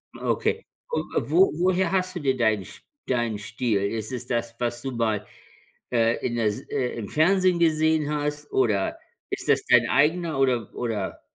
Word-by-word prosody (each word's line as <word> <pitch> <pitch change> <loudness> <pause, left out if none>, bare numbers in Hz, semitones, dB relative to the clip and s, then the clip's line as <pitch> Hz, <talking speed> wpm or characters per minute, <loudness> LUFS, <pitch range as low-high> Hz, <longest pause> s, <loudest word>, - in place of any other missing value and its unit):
Okay. 455 - -1 0.2
Und 475 - -2
wo 380 +2 +5
woher 185 0 +2
hast 185 -1 0
du - - -2
dir 135 -4 0
deinen 110 -4 +2
Sch - - -12 0.3
deinen 120 -4 0
Stil? 105 +1 -1
Ist 110 +2 -2
es 125 -1 -4
das, 115 -1 -2
was 120 0 -2
du 135 - -4
mal, 110 -3 -1 0.7
äh, 115 -1 +1
in 120 -1 -1
der 115 -2 +1
S 105 -1 0
äh, 125 -1 -1
im 110 -4 -5
Fernsehen 185 +3 +3
gesehen 160 -2 +2
hast, 150 0 -3
oder 105 -7 +1 0.3
ist - - -4
das - - +4
dein - - +5
eigener 160 +1 +2
oder 125 -5 +1
oder? 110 -6 -3
125 Hz, 175 wpm, -25 LUFS, 115-160 Hz, 0.7 s, wo